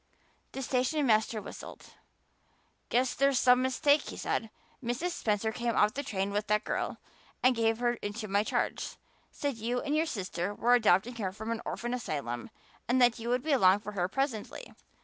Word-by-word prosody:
The 270 - -4
stationmaster 250 -5 +1
whistled. - - -10 1.0
"Guess 250 +1 +2
there's 275 -1 +2
some 250 0 +5
mistake," 285 +3 +3
he - - -7
said. 225 - -2 0.3
"Mrs. 245 +10 -1
Spencer 220 -7 0
came 235 0 -2
off 210 +1 +4
the 285 - -2
train 200 -7 -2
with 205 +1 -1
that 210 0 +2
girl - - -2 0.5
and 255 0 +5
gave 225 -1 +2
her 240 0 +1
into 215 -1 -5
my 200 +1 +2
charge. - - -2 0.3
Said 285 -4 -3
you 240 +3 -1
and 290 +3 -1
your 320 +2 +2
sister 190 - -3
were 240 +3 +3
adopting 235 0 +3
her 195 -5 -2
from 220 +4 -5
an 230 - -2
orphan 240 +1 -3
asylum 140 - -4 0.4
and 250 +2 +2
that 245 -1 +4
you 230 +1 -4
would 250 +1 +1
be 315 - -1
along 200 -7 +5
for 210 - -6
her 180 -3 -1
presently. 250 0 -3
235 Hz, 180 wpm, -30 LUFS, 210-255 Hz, 1.0 s, some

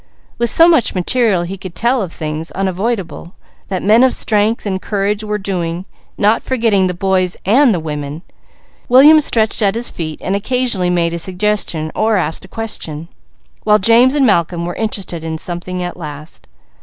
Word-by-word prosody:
With 235 0 +2
so 330 +9 +6
much 320 -13 +3
material 195 0 +1
he 185 +2 -6
could 185 -3 -9
tell 240 +4 +1
of 185 -4 -4
things 155 0 -5
unavoidable, 190 -3 -3 0.3
that 185 -2 -3
men 220 +5 +5
of 260 - +4
strength 215 +1 +1
and 190 -2 -2
courage 205 +1 -2
were 210 0 -2
doing, 180 -3 -4 0.3
not 215 +2 +2
forgetting 225 -7 +1
the 180 - -3
boys 185 -1 0
and 250 +6 +4
the 180 - 0
women. 150 0 -6 0.7
William 295 +5 +7
stretched 220 -5 +1
at 200 0 +2
his 235 +1 -4
feet 155 -2 -5
and 190 - -1
occasionally 220 -4 0
made 170 -1 0
a 170 - -3
suggestion, 180 -3 -1
or 220 0 +1
asked 160 -3 -2
a - - -12
question, 170 -7 -6 0.5
while 210 0 +4
James 230 +6 +4
and 280 -2 +3
Malcolm 170 -5 +1
were 175 - -4
interested 195 -6 -4
in 160 0 -4
something 180 +2 -4
at 175 - -5
last. 155 -2 -10
195 Hz, 175 wpm, -16 LUFS, 170-225 Hz, 0.7 s, William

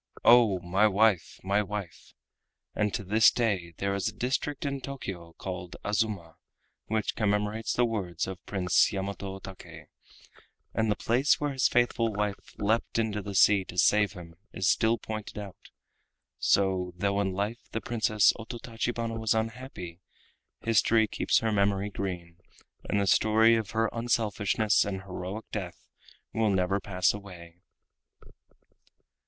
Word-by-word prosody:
(Oh! 115 -5 +6
my 95 +5 +3
wife, 105 -3 +2
my 100 +2 +2
wife!) 100 -3 -7 0.6
And 105 -1 0
to - - -3
this 110 +4 +5
day 95 -8 -1
there 100 0 -1
is 100 +1 -1
a - - -1
district 135 +5 -2
in 140 -1 -2
Tokio 95 -12 -7
called 90 -1 -6
Azuma, 105 -6 -1 0.5
which 110 -1 -1
commemorates 105 +1 0
the 120 - +3
words 95 -8 -2
of 95 -1 -7
Prince 90 -3 +2
Yamato 100 0 -4
Take, 95 -1 -11 0.8
and 110 -1 +1
the 105 - +2
place 125 +8 +2
where 145 -1 -1
his 130 -1 +3
faithful 120 -1 +1
wife 105 -1 -4
leapt 110 +3 0
into 110 -2 0
the 100 0 -6
sea 100 0 +5
to 90 - -10
save 105 +4 +4
him 85 -3 -11 0.2
is 95 - -1
still 115 +2 +3
pointed 110 -2 -7
out. 100 -3 -9 0.7
So, 95 -2 +2
though 100 +2 +1
in 95 -2 -1
life 105 +5 -2
the 115 - -2
Princess 110 -3 +2
Ototachibana 115 0 -4
was 110 0 +1
unhappy, 110 -6 -5 0.6
history 115 0 +3
keeps - - +1
her 110 0 0
memory 100 0 +1
green, 90 -4 -5 0.5
and 100 - +1
the 100 - +1
story 110 +4 +4
of 110 -3 -2
her 115 0 +1
unselfishness 110 -2 +1
and 95 -1 -4
heroic 95 +3 -6
death 90 -5 -6 0.5
will 110 -1 +2
never 95 0 +1
pass 90 -2 +1
away. 90 -4 -11
105 Hz, 145 wpm, -28 LUFS, 95-110 Hz, 0.8 s, Oh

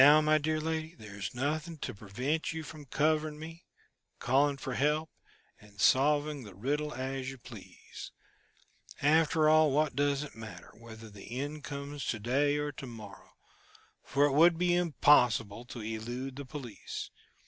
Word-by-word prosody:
"Now, 145 +2 +9
my 155 0 +4
dear 155 +1 0
lady, 160 +1 -3
there's 105 -2 -7
nothing 155 +5 -2
to 125 - -5
prevent 125 +12 -2
you 160 0 -4
from 150 -1 -10
covering 155 +2 +1
me, 165 +2 -10 0.5
calling 140 +3 +2
for 135 -1 -5
help, 150 +4 +1 0.5
and 105 -1 -18
solving 145 +5 +3
the 100 -4 -11
riddle 145 +8 -1
as 130 0 -3
you 135 - -8
please. 120 - -11 0.9
After 155 +1 +4
all, 155 0 +6
what 145 -1 +1
does 145 +1 +1
it 150 - -9
matter, 110 -6 -10
whether 115 -1 -11
the 105 +4 -8
end 145 +2 -4
comes 140 0 -5
to 110 - 0
day 140 +6 +2
or 145 0 -2
to 135 -1 -8
morrow, 110 -4 -11 0.7
for 140 +1 +2
it 145 - +2
would 165 +4 +6
be 175 0 +2
impossible 125 -10 +3
to 120 -1 -8
elude 120 +4 -4
the 140 - -6
police. 130 -7 -7
145 Hz, 160 wpm, -31 LUFS, 120-155 Hz, 0.9 s, Now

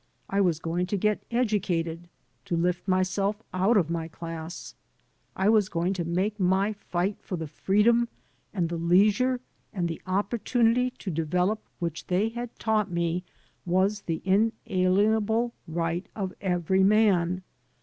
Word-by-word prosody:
I 200 +1 +2
was 175 -5 +2
going 170 +3 -2
to 205 - -1
get 210 +2 +1
educated, 175 -8 -1 0.4
to 170 - -1
lift 175 +2 0
myself 195 +3 0
out 195 +5 +3
of 165 -4 +1
my 165 -1 -2
class. 165 0 -7 0.6
I 190 - +1
was 215 -3 +4
going 170 +3 0
to 180 -3 -2
make 190 +6 -1
my 190 +3 +2
fight 195 -1 -2
for 185 - -4
the 165 -2 -4
freedom 210 +9 +2 0.4
and 180 -5 0
the 170 - -3
leisure 210 +9 +3 0.3
and 180 -4 -1
the 165 - -5
opportunity 230 +5 +1
to 245 -6 -7
develop 180 +7 0 0.2
which 170 -2 -4
they 190 +5 +1
had 240 +1 -7
taught 215 -2 +1
me 170 0 -1 0.4
was 190 +4 +1
the 165 -3 -4
inalienable 215 +2 +2
right 165 +2 -2
of 190 -3 -3
every 185 0 +1
man. 190 -3 +3
190 Hz, 145 wpm, -27 LUFS, 170-215 Hz, 0.6 s, was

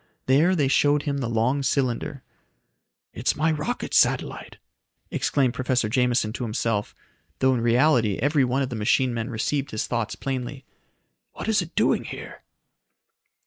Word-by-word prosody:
There 155 +8 +4
they 145 -5 +2
showed 145 +2 +3
him 140 -1 -2
the 125 -4 -2
long 120 +5 +1
cylinder. 135 0 -1 0.9
"It's - - 0
my 160 +2 +1
rocket 150 -1 -3
satellite!" - - +1 0.5
exclaimed 130 -4 +1
Professor 125 -3 0
Jameson 120 -2 +1
to 125 - -4
himself, 110 -2 -2 0.4
though 130 0 +3
in 120 - -1
reality 120 -3 +3
every 145 +2 +2
one 130 +2 +1
of 130 - -3
the 120 - -5
machine 120 +4 +1
men 115 +1 -3
received 135 +4 -2
his 110 - -2
thoughts 115 -2 -2
plainly. 130 0 -5 0.7
"What - - -7
is 220 -3 +3
it 175 -1 -9
doing 220 - +2
here?" - - -8
130 Hz, 150 wpm, -24 LUFS, 120-145 Hz, 0.9 s, There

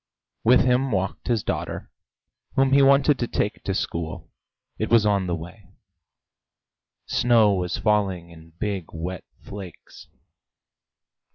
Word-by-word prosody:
With 125 +3 +6
him 130 +2 +2
walked 95 -2 -2
his 115 -4 +1
daughter, - - -4 0.6
whom 135 0 +3
he 140 - +6
wanted 140 +1 +4
to 120 - -1
take - - -2
to - - -1
school: 80 -1 -4 0.5
it - - -1
was 115 -2 +5
on 100 -3 +1
the 85 - -1
way. 85 +4 -10 1.4
Snow 120 -5 +3
was 90 -1 -2
falling 95 -6 0
in 80 0 -15
big 100 -5 -2
wet 85 +2 -5 0.2
flakes. 95 -4 -11
105 Hz, 125 wpm, -24 LUFS, 90-120 Hz, 1.4 s, With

